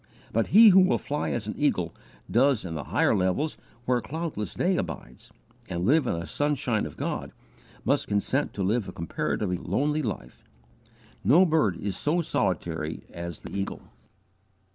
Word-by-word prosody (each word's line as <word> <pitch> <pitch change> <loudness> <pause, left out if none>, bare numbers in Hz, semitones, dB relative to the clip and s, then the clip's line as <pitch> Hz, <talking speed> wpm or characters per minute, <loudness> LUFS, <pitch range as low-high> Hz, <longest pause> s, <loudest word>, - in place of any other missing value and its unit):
But 115 0 +2
he 220 +3 +8
who 190 -1 +7
will 185 0 +4
fly 145 +1 -3
as 120 -3 -2
an 105 - -3
eagle 90 - 0 0.3
does 130 -3 +3
into 85 - -4
the 75 -4 -5
higher - - +2
levels 95 +12 0 0.3
where 125 0 +2
cloudless 150 - -4
day - - +2
abides, 60 +1 -6 0.4
and 85 +1 -2
live 145 +3 +4
in 85 - 0
the 85 - -5
sunshine 135 - 0
of 75 - -12
God, - - -3 0.5
must - - +1
consent 115 +8 0
to 100 - -1
live 105 +3 +1
a - - -5
comparatively 90 +3 -2
lonely 145 - 0
life. 105 - -5 0.8
No 170 +8 +6
bird 155 - +2
is 100 +3 -3
so 155 +4 0
solitary 80 - -2
as 85 -2 -6
the - - -8
eagle. 100 0 -3
110 Hz, 165 wpm, -27 LUFS, 90-150 Hz, 0.8 s, he